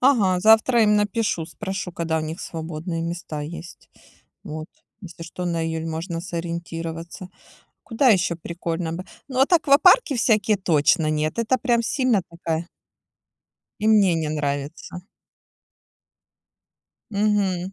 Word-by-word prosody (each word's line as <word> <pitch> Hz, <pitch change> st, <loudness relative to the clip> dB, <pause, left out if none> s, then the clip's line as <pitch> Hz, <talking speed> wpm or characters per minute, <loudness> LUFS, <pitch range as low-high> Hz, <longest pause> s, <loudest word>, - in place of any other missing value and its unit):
Ага, 210 Hz, -9 st, +3 dB
завтра 220 Hz, +3 st, +5 dB
им 210 Hz, 0 st, +4 dB
напишу, 205 Hz, -4 st, 0 dB
спрошу, 190 Hz, -1 st, -5 dB
когда 165 Hz, -1 st, -1 dB
у -, -, -1 dB
них 155 Hz, +3 st, -5 dB
свободные 165 Hz, +1 st, -5 dB
места 165 Hz, -3 st, -5 dB
есть, 165 Hz, +3 st, -9 dB, 0.5 s
вот. 155 Hz, +1 st, -6 dB, 0.3 s
Если 170 Hz, -3 st, -10 dB
что 180 Hz, +2 st, -6 dB
на 170 Hz, -2 st, -1 dB
июль 160 Hz, 0 st, -3 dB
можно 165 Hz, +1 st, -4 dB
сориентироваться. 170 Hz, +1 st, -6 dB, 0.5 s
Куда 250 Hz, +3 st, +1 dB
ещё 180 Hz, -5 st, +3 dB
прикольно 170 Hz, 0 st, -4 dB
бы? 180 Hz, +2 st, -5 dB, 0.2 s
Ну, 260 Hz, -2 st, -3 dB
вот, 270 Hz, +6 st, +3 dB
аквапарки 330 Hz, -, +5 dB
всякие, 215 Hz, -3 st, +2 dB
точно 160 Hz, -2 st, +2 dB
нет. 155 Hz, +3 st, -1 dB
Это 230 Hz, +3 st, +1 dB
прям 240 Hz, -3 st, +1 dB
сильно 255 Hz, -6 st, +1 dB
такая 170 Hz, 0 st, -3 dB, 1.1 s
И 215 Hz, -, 0 dB
мне 200 Hz, -5 st, +5 dB
не 160 Hz, -2 st, -1 dB
нравится. 145 Hz, +3 st, -4 dB, 2.1 s
Мгм. 200 Hz, -3 st, 0 dB
175 Hz, 125 wpm, -23 LUFS, 165-215 Hz, 2.1 s, завтра